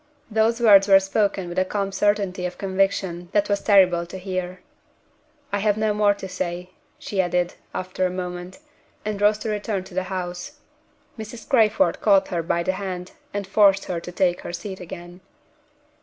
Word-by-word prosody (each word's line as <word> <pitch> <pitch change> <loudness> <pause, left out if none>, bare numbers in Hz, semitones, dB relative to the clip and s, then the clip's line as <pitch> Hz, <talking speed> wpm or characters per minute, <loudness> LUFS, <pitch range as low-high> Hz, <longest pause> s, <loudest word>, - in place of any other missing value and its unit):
Those 225 +2 +2
words 205 -4 +7
were 195 -1 +8
spoken 195 -1 0
with 175 +1 -2
a - - +4
calm 195 +1 -2
certainty 200 -2 0
of 180 - -9
conviction 190 -2 -1
that 205 -1 +2
was 200 0 +1
terrible 180 -4 +4
to 185 - -8
hear. 185 -1 -4 0.9
"I 200 - +1
have 205 0 +1
no 215 -1 +1
more 205 -1 +3
to 195 - -7
say," 180 -1 -4 0.3
she 195 -2 -1
added, 175 -1 0 0.2
after 185 0 -2
a - - -4
moment, 180 0 -6 0.5
and 210 -1 -3
rose 210 +1 +4
to - - -1
return 205 -2 -2
to 190 0 -14
the 185 +1 -1
house. 180 +3 -5 0.7
Mrs. 220 +1 -8
Crayford 230 +1 +3
caught 200 -3 +4
her 175 -3 -1
by 170 +1 -1
the 185 - +1
hand, 180 -2 -5 0.2
and 205 -1 -3
forced 195 0 +4
her 175 -2 -3
to 175 - -8
take 180 -1 +1
her - - -7
seat 190 +2 -6
again. 175 +1 -10
190 Hz, 180 wpm, -23 LUFS, 180-205 Hz, 0.9 s, were